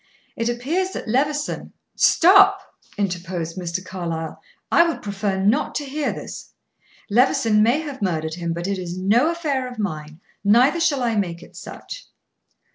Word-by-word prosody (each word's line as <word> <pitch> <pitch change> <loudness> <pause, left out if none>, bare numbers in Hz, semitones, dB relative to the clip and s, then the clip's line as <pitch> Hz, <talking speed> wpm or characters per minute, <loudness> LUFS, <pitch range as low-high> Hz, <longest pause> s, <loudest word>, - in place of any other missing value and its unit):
It 230 +1 -1
appears 315 +11 -1
that - - -6
Levison 290 +5 -1
" - - -54
"Stop!" 390 +3 +6 0.4
interposed 175 -4 -3
Mr. 185 0 -4
Carlyle. 170 -4 -5 0.3
"I 340 - +6
would 330 - -4
prefer 200 -1 -2
not 200 +4 +1
to 290 - -2
hear 290 +2 -2
this. - - -9 0.6
Levison 225 -2 +3
may 240 +8 +3
have 290 -6 -7
murdered 160 -5 -1
him, 170 0 -3
but 170 +1 -4
it 195 0 -2
is 180 0 -5
no 215 - +3
affair 295 -7 -1
of 245 - -10
mine, 155 -6 -4 0.2
neither 245 +11 +4
shall 300 -6 +1
I 230 -2 +1
make 175 -4 -2
it - - -16
such." - - -9
210 Hz, 160 wpm, -22 LUFS, 180-285 Hz, 0.6 s, Stop